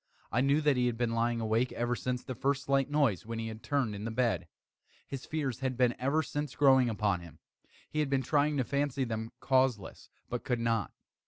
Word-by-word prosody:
I 120 - +2
knew 140 +3 +3
that 145 -3 +3
he 125 0 +2
had 120 -2 -1
been 120 -1 0
lying 115 0 +1
awake 115 +3 +1
ever 120 +1 -1
since 125 0 -3
the 130 - -5
first 135 +3 0
slight 135 0 +1
noise, 140 -10 +2
when 115 +1 -5
he 115 0 -3
had 110 0 -8
turned 135 -7 0
in 100 0 -6
the 115 - -2
bed. 120 +1 0 0.6
His 135 -1 -7
fears 140 -6 -2
had 130 -2 -2
been 125 -2 +3
ever 140 +5 +1
since 145 -2 -4
growing 130 -3 +5
upon 105 -4 0
him. 85 -2 -12 0.5
He 155 - -3
had 150 -2 +1
been 135 -1 +1
trying 145 +2 +2
to 130 - +2
fancy 140 +1 -1
them 110 -2 -3
causeless, 130 -6 0 0.2
but 120 - -4
could 125 -2 -1
not. 115 -4 0
125 Hz, 220 wpm, -31 LUFS, 115-140 Hz, 0.6 s, growing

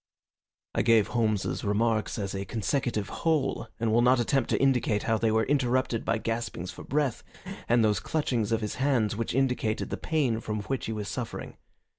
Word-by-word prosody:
I - - +1
gave 115 -3 +4
Holmes's 110 -4 0
remarks 110 +2 +1
as 100 -3 -3
a 95 0 -3
consecutive 110 0 -1
whole 155 -7 +1
and 115 -1 +1
will 120 - +5
not 125 +1 +4
attempt 125 +1 +1
to - - +1
indicate 125 -6 +2
how 110 -3 +1
they 115 - +2
were 110 0 +2
interrupted 130 -3 +1
by - - +1
gaspings 115 -6 -3
for - - -10
breath 140 -4 0 0.5
and 120 -1 +4
those 105 -1 +2
clutchings 120 -8 -1
of 115 0 +1
his 105 - -3
hands 125 -7 +2
which 115 +1 -2
indicated 125 -5 0
the - - -2
pain 135 -8 0
from 105 -2 -3
which 135 +4 -3
he - - -2
was 105 -2 -4
suffering. - - -5
115 Hz, 185 wpm, -28 LUFS, 110-130 Hz, 0.5 s, will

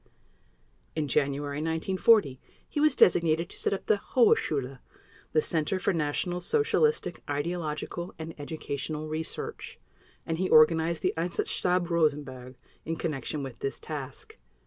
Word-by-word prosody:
In 155 -2 -1
January 140 +1 0
1940, 165 - +2 0.3
he - - -3
was 305 +1 +4
designated 170 -1 +4
to - - -7
set - - +1
up 195 - -3
the 205 -2 +2
"Hohe 240 -4 +7
Schule," 135 -3 -3 0.5
the 155 - +2
Center 160 +2 +1
of 185 - -5
National 165 +3 -1
Socialistic 450 - +1
Ideological 160 +3 -3
and 160 0 -6
Educational 150 0 -4
Research, 155 +1 -5 0.5
and 165 0 -2
he 185 - 0
organized 160 +1 +5
the - - +2
"Einsatzstab 175 +1 0
Rosenberg" 140 -6 -1 0.3
in 165 - -3
connection 150 -2 -3
with 130 -4 -8
this 135 - -3
task. 140 - -7
160 Hz, 130 wpm, -28 LUFS, 145-175 Hz, 0.5 s, Hohe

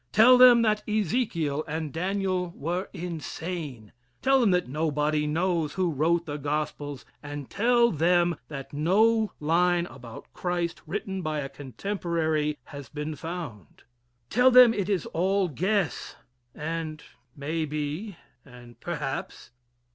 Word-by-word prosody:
Tell 235 - +7
them 250 -2 +8
that 215 -1 +2
Ezekiel 170 - 0
and 155 -1 -4
Daniel 185 0 -1
were 175 +6 -3
insane. 160 - -6 0.3
Tell 270 0 +4
them 230 - +4
that 180 -5 +2
nobody 150 +1 0
knows 165 -1 0
who 185 -2 0
wrote 165 +4 +1
the 145 -2 -4
gospels, 145 -1 -3 0.2
and 145 -2 -7
tell 235 +2 +3
them 175 +1 +2
that 135 -2 -8
no 215 +8 +3
line 175 +3 +2
about 125 -8 -11
Christ 175 -1 -2
written 195 -1 -3
by 155 -2 -2
a 135 - -5
contemporary 155 0 -2
has 140 -4 -10
been 150 +1 -4
found. 160 - -8 0.5
Tell 250 +4 +5
them 250 -2 +8
it 200 -2 -2
is 190 -6 0
all 190 +3 +1
guess 185 - -1 0.4
and 155 -1 -4 0.3
may 155 +3 -2
be, 155 +6 -4 0.3
and 120 -3 -15
perhaps. 150 -8 -5
165 Hz, 130 wpm, -27 LUFS, 150-190 Hz, 0.5 s, them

